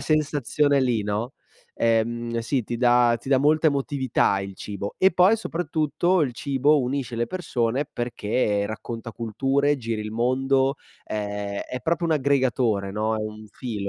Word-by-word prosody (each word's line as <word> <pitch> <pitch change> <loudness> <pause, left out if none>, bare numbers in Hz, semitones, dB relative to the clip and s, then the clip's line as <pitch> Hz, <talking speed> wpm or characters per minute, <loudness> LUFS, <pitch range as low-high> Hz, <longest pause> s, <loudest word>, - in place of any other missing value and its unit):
sensazione 145 -1 +1
lì, 120 -5 +1
no, 105 +5 -2 0.4
ehm, 115 +1 0
sì, 120 +1 -1
ti 120 - -4
dà 120 -1 +4
ti 125 - -10
dà 135 - +4
molta 155 +3 +4
emotività 135 -7 0
il 100 0 -6
cibo. 100 -1 -6
E 190 +1 +5
poi, 185 +5 +5
soprattutto, 170 -1 0
il 135 -4 -1
cibo 140 +3 +2
unisce 130 -1 -2
le 120 0 -1
persone 135 -8 -1
perché 110 -3 -1
racconta 115 +1 -6
culture, 135 +6 0
giri 115 -4 -3
il 105 - -5
mondo, 130 +4 +1 0.3
ehm, 105 -1 -4
è 125 - -4
proprio 170 0 0
un 165 - +2
aggregatore, 130 -8 +1
no, 110 +2 -1
è - - -3
un 110 0 -7
filo. 120 0 -6
125 Hz, 155 wpm, -24 LUFS, 110-140 Hz, 0.4 s, E